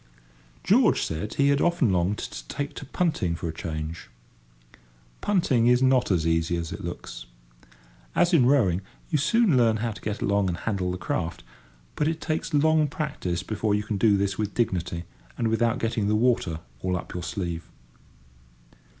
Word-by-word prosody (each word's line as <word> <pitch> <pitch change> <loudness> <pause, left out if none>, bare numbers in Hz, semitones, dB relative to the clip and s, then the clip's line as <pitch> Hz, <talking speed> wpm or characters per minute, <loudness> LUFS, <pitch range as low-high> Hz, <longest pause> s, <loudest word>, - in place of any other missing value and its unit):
George - - +4
said 80 +7 -4
he 140 0 +3
had 140 0 +3
often 170 - +2
longed 90 +3 +1
to - - -7
take 145 - -4
to 140 - -8
punting 145 - 0
for 85 - -4
a 80 - -4
change. 80 0 -5 1.1
Punting 140 - +2
is 125 +1 +4
not 130 -1 +3
as 85 -5 +1
easy 80 +1 +1
as 85 -1 -4
it - - -6
looks. - - -7 0.9
As 175 +1 +3
in 130 -7 +5
rowing, 100 -10 +3 0.3
you 155 - +2
soon 225 - +3
learn 115 -3 +4
how 115 +1 -2
to - - -10
get 105 0 -3
along 100 -4 +1
and 85 - -2
handle 95 -4 -2
the 90 - -3
craft, 90 -2 -3 0.5
but 150 - +1
it 160 0 -1
takes 160 0 -2
long 155 0 +3
practice 140 - -3
before 105 0 0
you 105 - -1
can 105 -1 -3
do 105 0 +4
this 100 0 -1
with 105 -1 -2
dignity 85 -7 -1 0.3
and 115 -2 0
without 115 +1 +1
getting 115 -2 -1
the 105 - +2
water 105 -9 +1 0.2
all 90 -1 0
up - - -8
your 90 - -4
sleeve. 85 -2 -4
105 Hz, 175 wpm, -26 LUFS, 90-135 Hz, 1.1 s, in